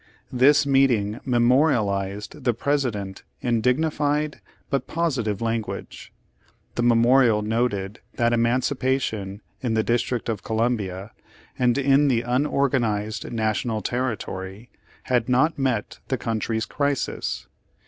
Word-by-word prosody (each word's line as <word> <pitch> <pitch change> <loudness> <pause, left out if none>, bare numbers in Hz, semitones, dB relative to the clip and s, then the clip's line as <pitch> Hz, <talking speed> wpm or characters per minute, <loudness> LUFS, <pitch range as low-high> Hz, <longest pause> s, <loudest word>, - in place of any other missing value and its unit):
This 140 +3 +5
meeting 125 -6 +2
memorialized 120 -3 +1
the 120 -3 +1
President 115 -8 -2 0.2
in 120 -2 0
dignified 150 +3 0 0.3
but 140 - -1
positive 125 - -1
language. 115 -1 -4 0.6
The - - -2
memorial 120 -1 +4
noted 105 -3 -1 0.2
that 120 0 +2
emancipation 120 -4 0 0.2
in 120 -3 -1
the 110 - +2
Dis 120 +1 +2
trict 125 -3 -3
of 110 -4 -2
Columbia, 110 -4 -2 0.5
and 125 0 +3
in 140 +1 +4
the 120 -3 +2
unorganized 125 -5 0
National 110 0 -1
territory, 110 -3 -4 0.3
had 125 -1 0
not 145 +6 +2
met 125 -6 -1
the 130 - -1
country's 110 0 -2
crisis. 140 -2 -2
120 Hz, 110 wpm, -24 LUFS, 110-135 Hz, 0.6 s, This